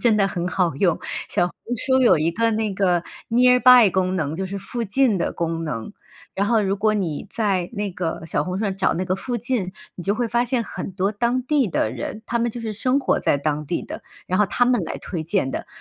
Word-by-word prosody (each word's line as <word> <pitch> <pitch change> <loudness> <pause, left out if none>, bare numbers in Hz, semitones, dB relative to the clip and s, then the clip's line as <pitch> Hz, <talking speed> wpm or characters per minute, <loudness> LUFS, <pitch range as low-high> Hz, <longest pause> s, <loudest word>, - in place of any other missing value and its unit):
真 230 -3 +4
的 195 -2 +3
很 175 -2 -3
好 180 -4 0
用。 170 +3 +1 0.3
小 - - +1
红 180 - -9 0.2
书 260 +3 +2
有 240 -10 +5
一 165 +2 +1
个 230 +4 +2
那 215 -2 -1
个 180 -3 +1 0.3
nearby 250 -1 +7
功 185 0 0
能， 155 -3 -2
就 190 - -3
是 200 +2 -5
附 235 +5 -4
近 230 +1 +2
的 170 - -1
功 165 -1 -2
能。 150 - -5 0.4
然 195 - 0
后 225 +1 +3
如 195 -1 0
果 215 +1 +2
你 175 -8 -2
在 195 -6 0
那 205 -2 -2
个 170 -3 -3
小 145 - 0
红 180 +3 -3
书 220 - -1
上 195 -2 -2
找 195 - +1
那 180 +3 -2
个 185 - 0
附 240 +5 -3
近， 235 -6 -2 0.2
你 180 - -8
就 195 +3 +1
会 240 0 0
发 240 +1 +1
现 245 -1 -1
很 - - -6
多 190 +2 -1
当 240 +4 0
地 270 -5 +2
的 110 -8 0
人， 170 - -6
他 235 0 -1
们 235 - +1
就 240 - -6
是 225 -1 -4
生 255 +6 +1
活 275 - +1
在 140 - +2
当 150 +1 -1
地 170 - -2
的， - - -8 0.2
然 185 - 0
后 210 - +4
他 240 +4 +1
们 245 -2 +2
来 160 - -5
推 170 -4 -5
荐 160 -4 0
的， - - -4
200 Hz, 280 characters per minute, -22 LUFS, 175-235 Hz, 0.4 s, nearby